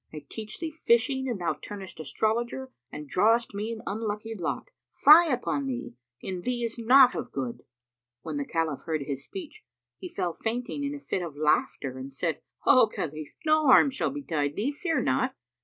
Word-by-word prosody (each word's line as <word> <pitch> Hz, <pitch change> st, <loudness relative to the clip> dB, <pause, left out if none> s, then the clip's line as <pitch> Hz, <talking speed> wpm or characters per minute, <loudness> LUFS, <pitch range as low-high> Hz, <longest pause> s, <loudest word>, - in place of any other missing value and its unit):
I 150 Hz, -2 st, -9 dB
teach 215 Hz, -1 st, -7 dB
thee 325 Hz, -1 st, -4 dB
fishing 265 Hz, -2 st, +1 dB
and 230 Hz, -5 st, -2 dB
thou 175 Hz, -, 0 dB
turnest 195 Hz, -4 st, -9 dB
astrologer 235 Hz, -, -1 dB, 0.2 s
and 150 Hz, 0 st, -7 dB
drawest 225 Hz, -, +3 dB
me 210 Hz, +3 st, -3 dB
an 230 Hz, 0 st, -6 dB
unlucky 215 Hz, +1 st, -3 dB
lot. 190 Hz, -, -4 dB, 0.2 s
Fie 325 Hz, +3 st, +7 dB
upon 275 Hz, +2 st, -1 dB
thee,[FN#285] 255 Hz, -1 st, -4 dB, 0.3 s
in 185 Hz, -2 st, -4 dB
thee 245 Hz, +3 st, -2 dB
is 230 Hz, 0 st, -3 dB
naught 255 Hz, +2 st, +7 dB
of -, -, -5 dB
good!" 130 Hz, -3 st, -4 dB, 0.6 s
When 155 Hz, -3 st, -4 dB
the 145 Hz, -, -2 dB
Caliph 160 Hz, -3 st, -2 dB
heard 155 Hz, -3 st, -1 dB
his 140 Hz, -1 st, -4 dB
speech, 385 Hz, +3 st, -9 dB, 0.4 s
he 365 Hz, -, -7 dB
fell 180 Hz, -, -2 dB
fainting 245 Hz, -, -3 dB
in 285 Hz, +1 st, -2 dB
a -, -, -7 dB
fit 190 Hz, -, -3 dB
of 165 Hz, -5 st, -6 dB
laughter 145 Hz, -3 st, 0 dB
and 135 Hz, +1 st, -7 dB
said, 160 Hz, +3 st, -2 dB, 0.2 s
"O 255 Hz, -4 st, +7 dB
Khalif, 155 Hz, -7 st, -6 dB
no 310 Hz, -1 st, +4 dB
harm 265 Hz, +2 st, +7 dB
shall 265 Hz, -, -1 dB
betide 155 Hz, -, -2 dB
thee: 240 Hz, +8 st, 0 dB
fear 305 Hz, -3 st, -1 dB
not. 130 Hz, 0 st, +1 dB
220 Hz, 185 wpm, -27 LUFS, 160-265 Hz, 0.6 s, Fie